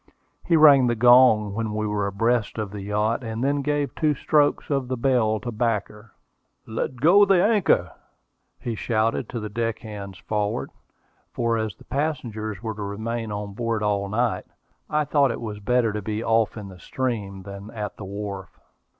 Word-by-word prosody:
He 170 Hz, -, +3 dB
rang 140 Hz, -5 st, +7 dB
the 120 Hz, -, +1 dB
gong 120 Hz, -3 st, +6 dB
when 110 Hz, 0 st, -3 dB
we 110 Hz, 0 st, -1 dB
were 105 Hz, -1 st, -1 dB
abreast 115 Hz, +3 st, 0 dB
of 105 Hz, -3 st, -3 dB
the 105 Hz, -1 st, -6 dB
yacht, 105 Hz, +5 st, -1 dB
and 115 Hz, +1 st, -4 dB
then 140 Hz, +1 st, +1 dB
gave 145 Hz, 0 st, -1 dB
two 150 Hz, -2 st, +1 dB
strokes 145 Hz, +2 st, +1 dB
of 135 Hz, -3 st, 0 dB
the 130 Hz, 0 st, -2 dB
bell 115 Hz, -4 st, +2 dB
to 120 Hz, -, -4 dB
back 110 Hz, -2 st, 0 dB
her. 105 Hz, 0 st, -16 dB, 0.5 s
"Let 115 Hz, +3 st, -3 dB
go 170 Hz, +11 st, +6 dB
the 195 Hz, -3 st, +4 dB
anchor!" 210 Hz, -4 st, +2 dB, 0.7 s
he 120 Hz, -, -3 dB
shouted 110 Hz, +1 st, -1 dB
to 120 Hz, -, -4 dB
the 105 Hz, -, -4 dB
deckhands 105 Hz, -3 st, -4 dB
forward, 105 Hz, -1 st, -2 dB, 0.6 s
for 115 Hz, -1 st, 0 dB
as 110 Hz, -2 st, -2 dB
the -, -, -18 dB
passengers 115 Hz, -8 st, -3 dB
were 110 Hz, -1 st, -3 dB
to 105 Hz, -, -8 dB
remain 110 Hz, +3 st, -4 dB
on 105 Hz, -1 st, -5 dB
board 115 Hz, 0 st, -2 dB
all 100 Hz, -1 st, 0 dB
night, 120 Hz, +3 st, 0 dB, 0.4 s
I 150 Hz, 0 st, +1 dB
thought 140 Hz, -1 st, +3 dB
it 115 Hz, -, -3 dB
was 105 Hz, -3 st, -6 dB
better 115 Hz, +1 st, +1 dB
to 105 Hz, -, -3 dB
be 110 Hz, +2 st, -3 dB
off 115 Hz, -1 st, +1 dB
in 100 Hz, -2 st, -7 dB
the 90 Hz, -1 st, -13 dB
stream 105 Hz, -7 st, -3 dB
than 100 Hz, +1 st, -9 dB
at 105 Hz, -3 st, -6 dB
the 100 Hz, -, -7 dB
wharf. 100 Hz, -1 st, -7 dB
110 Hz, 185 wpm, -24 LUFS, 105-125 Hz, 0.7 s, rang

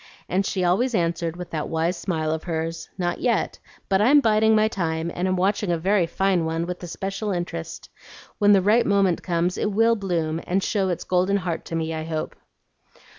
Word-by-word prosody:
and 190 Hz, +2 st, 0 dB
she 185 Hz, -, -1 dB
always 225 Hz, +8 st, +2 dB
answered 170 Hz, -2 st, -1 dB
with 180 Hz, -1 st, -8 dB
that 155 Hz, -2 st, -3 dB
wise 165 Hz, +2 st, 0 dB
smile 160 Hz, -4 st, -2 dB
of 160 Hz, 0 st, -3 dB
hers, 165 Hz, -1 st, -3 dB
"Not 175 Hz, -2 st, -1 dB
yet, 240 Hz, -4 st, 0 dB, 0.3 s
but 195 Hz, 0 st, +2 dB
I'm 275 Hz, +7 st, +6 dB
biding 220 Hz, -3 st, +3 dB
my 215 Hz, 0 st, +4 dB
time, 165 Hz, -4 st, -2 dB
and 180 Hz, +2 st, -1 dB
am 185 Hz, -, +1 dB
watching 195 Hz, +1 st, 0 dB
a 170 Hz, -, +1 dB
very 185 Hz, +1 st, +2 dB
fine 190 Hz, 0 st, +1 dB
one 165 Hz, +1 st, -1 dB
with 180 Hz, 0 st, -6 dB
especial 195 Hz, +4 st, -4 dB
interest. 175 Hz, -, -5 dB, 0.5 s
When 205 Hz, 0 st, +6 dB
the 195 Hz, -2 st, +4 dB
right 225 Hz, +4 st, +3 dB
moment 195 Hz, -4 st, +2 dB
comes, 175 Hz, 0 st, -1 dB
it -, -, 0 dB
will 225 Hz, +3 st, +3 dB
bloom 165 Hz, -6 st, -2 dB
and 190 Hz, +2 st, +1 dB
show 195 Hz, -3 st, 0 dB
its 175 Hz, -, -2 dB
golden 185 Hz, +2 st, +1 dB
heart 180 Hz, -4 st, -3 dB
to 165 Hz, -, -5 dB
me, 160 Hz, 0 st, -2 dB
I 160 Hz, 0 st, -4 dB
hope." 160 Hz, -1 st, -4 dB
180 Hz, 200 wpm, -24 LUFS, 165-200 Hz, 0.5 s, I'm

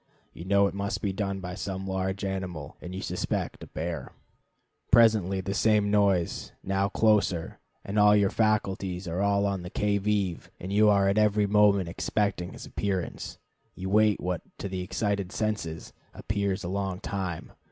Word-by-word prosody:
You 85 Hz, -, -9 dB
know 100 Hz, +1 st, +4 dB
it 100 Hz, -, -1 dB
must 100 Hz, +3 st, -3 dB
be 100 Hz, -2 st, 0 dB
done 95 Hz, -1 st, -2 dB
by 90 Hz, -1 st, -5 dB
some 95 Hz, -1 st, -4 dB
large 95 Hz, +1 st, -2 dB
animal, 90 Hz, -6 st, -4 dB
and 90 Hz, +1 st, -7 dB
you 95 Hz, -, -5 dB
suspect -, -, -3 dB
a -, -, -8 dB
bear. 85 Hz, +1 st, -5 dB, 0.8 s
Presently 105 Hz, -5 st, +4 dB
the 95 Hz, +1 st, -3 dB
same 105 Hz, 0 st, +3 dB
noise, 100 Hz, -4 st, +1 dB
but 95 Hz, +1 st, 0 dB
closer, 105 Hz, -7 st, +1 dB, 0.3 s
and 100 Hz, +2 st, -3 dB, 0.2 s
your 100 Hz, -1 st, +2 dB
faculties 95 Hz, -4 st, 0 dB
are 85 Hz, +3 st, -2 dB
all 100 Hz, 0 st, +2 dB
on 100 Hz, -2 st, -1 dB
the 90 Hz, -, -7 dB
qui 105 Hz, +1 st, 0 dB
vive, 100 Hz, -4 st, -1 dB
and 95 Hz, +2 st, -5 dB
you 105 Hz, +1 st, +5 dB
are 100 Hz, -1 st, +4 dB
every 105 Hz, -1 st, +3 dB
moment 100 Hz, -2 st, +4 dB
expecting 90 Hz, +1 st, -1 dB
his -, -, -9 dB
appearance. 95 Hz, -4 st, -3 dB, 0.4 s
You 95 Hz, +1 st, -5 dB
wait 105 Hz, 0 st, +4 dB
what, 90 Hz, -2 st, -2 dB, 0.2 s
to -, -, -4 dB
the 95 Hz, -1 st, -4 dB
excited 100 Hz, 0 st, -2 dB
senses, 100 Hz, -7 st, -3 dB, 0.2 s
appears 100 Hz, -2 st, -2 dB
a -, -, -3 dB
long 95 Hz, 0 st, -2 dB
time. 95 Hz, -5 st, -4 dB
100 Hz, 165 wpm, -28 LUFS, 95-105 Hz, 0.8 s, you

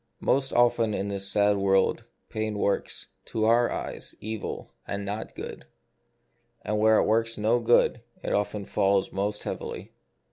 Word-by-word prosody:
Most 135 Hz, 0 st, +2 dB
often 115 Hz, -3 st, +3 dB
in 100 Hz, +1 st, -2 dB
this 100 Hz, -1 st, -3 dB
sad 105 Hz, 0 st, +3 dB
world 95 Hz, -1 st, +2 dB, 0.2 s
pain 110 Hz, -1 st, -3 dB
works, 100 Hz, 0 st, -1 dB, 0.2 s
to 110 Hz, -1 st, -1 dB
our 120 Hz, +2 st, +4 dB
eyes, -, -, -5 dB
evil, 110 Hz, 0 st, -5 dB, 0.2 s
and 100 Hz, 0 st, -3 dB
not 105 Hz, +2 st, -5 dB
good; -, -, -7 dB, 1.0 s
and 105 Hz, +1 st, -1 dB
where 110 Hz, 0 st, +5 dB
it -, -, +3 dB
works 115 Hz, +1 st, +2 dB
no 110 Hz, +3 st, +2 dB
good, 120 Hz, 0 st, +3 dB, 0.2 s
it -, -, -1 dB
often 105 Hz, 0 st, -1 dB
falls 95 Hz, 0 st, +1 dB
most 105 Hz, +2 st, -2 dB
heavily. -, -, -5 dB
105 Hz, 150 wpm, -27 LUFS, 100-115 Hz, 1.0 s, where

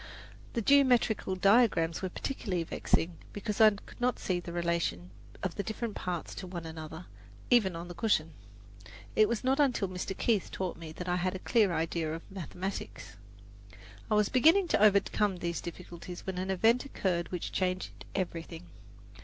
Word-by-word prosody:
The 230 Hz, -, -1 dB
geometrical 245 Hz, -7 st, +4 dB
diagrams 190 Hz, -4 st, +3 dB
were 190 Hz, -, -2 dB
particularly 185 Hz, -5 st, -3 dB
vexing 165 Hz, +1 st, 0 dB, 0.2 s
because 205 Hz, +1 st, -2 dB
I 220 Hz, -, +10 dB
could 205 Hz, +3 st, -11 dB
not 250 Hz, 0 st, +2 dB
see 180 Hz, -2 st, -1 dB
the 175 Hz, 0 st, -7 dB
relation 170 Hz, -, -1 dB, 0.3 s
of 185 Hz, -3 st, -1 dB
the -, -, -2 dB
different 220 Hz, +1 st, -4 dB
parts 180 Hz, -4 st, -4 dB
to 185 Hz, -, -7 dB
one 175 Hz, -2 st, -6 dB
another, 160 Hz, +1 st, -7 dB, 0.5 s
even 205 Hz, -8 st, +4 dB
on 170 Hz, +1 st, -6 dB
the 175 Hz, -, -7 dB
cushion. 165 Hz, -5 st, +1 dB, 0.8 s
It 215 Hz, -1 st, +5 dB
was 235 Hz, 0 st, -1 dB
not 265 Hz, +3 st, +2 dB
until 250 Hz, -8 st, +2 dB
Mr. 185 Hz, +1 st, -5 dB
Keith 220 Hz, -5 st, +1 dB
taught 185 Hz, -2 st, -3 dB
me 165 Hz, -2 st, -9 dB
that 180 Hz, +2 st, -7 dB
I 180 Hz, 0 st, +1 dB
had 185 Hz, +1 st, -1 dB
a 185 Hz, -, -8 dB
clear 220 Hz, -6 st, +4 dB
idea 160 Hz, -1 st, -1 dB
of 165 Hz, -, -8 dB
mathematics. 190 Hz, +1 st, -6 dB, 0.9 s
I 215 Hz, -, +3 dB
was 210 Hz, -1 st, +3 dB
beginning 325 Hz, +9 st, +5 dB
to -, -, +2 dB
overcome 205 Hz, -1 st, +3 dB
these 170 Hz, -1 st, -3 dB
difficulties 175 Hz, 0 st, -8 dB
when 190 Hz, -1 st, -3 dB
an 185 Hz, +1 st, -3 dB
event 225 Hz, +6 st, +3 dB
occurred 180 Hz, -10 st, -2 dB
which 180 Hz, -2 st, -4 dB
changed 185 Hz, -1 st, -2 dB
everything. 165 Hz, -, -4 dB
185 Hz, 170 wpm, -31 LUFS, 170-215 Hz, 0.9 s, I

